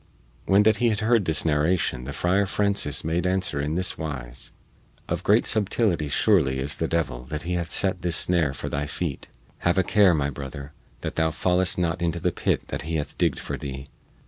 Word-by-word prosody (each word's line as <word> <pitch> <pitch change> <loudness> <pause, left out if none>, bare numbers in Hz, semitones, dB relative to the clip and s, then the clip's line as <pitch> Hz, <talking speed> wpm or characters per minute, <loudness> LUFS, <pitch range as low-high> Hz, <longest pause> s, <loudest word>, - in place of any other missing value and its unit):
When 100 +2 +5
that 110 0 +4
he 120 -1 +2
had 110 0 -1
heard 110 -2 +3
this 80 0 +1
narration 75 -4 +1
the 70 - -5
Friar 95 +6 +1
Francis 100 -8 0
made 85 +3 0
answer 90 -6 0
in 75 +2 -2
this 95 +1 -1
wise: 65 -5 -5 0.6
"Of - - -2
great - - +4
subtility 100 -7 +1
surely 75 -4 +2
is 70 +3 +1
the 80 - -1
devil 75 -8 -1
that 75 +3 -5
he 90 +2 -3
hath 85 -1 -2
set 95 -2 +1
this 90 -2 +2
snare 80 -6 +2
for - - -5
thy 75 +1 -2
feet. 75 -1 -4 0.3
Have 85 +2 +1
a 95 - +4
care, 100 -3 +4
my 70 -2 0
brother, 70 +1 -8 0.3
that - - -5
thou 80 0 +2
fallest 90 +3 +1
not 85 0 -1
into 85 0 -1
the 90 +1 0
pit - - -1
which - - -3
he 80 +2 -4
hath 75 -2 -3
digged - - +1
for - - -5
thee! 65 0 -7
85 Hz, 205 wpm, -25 LUFS, 75-95 Hz, 0.6 s, When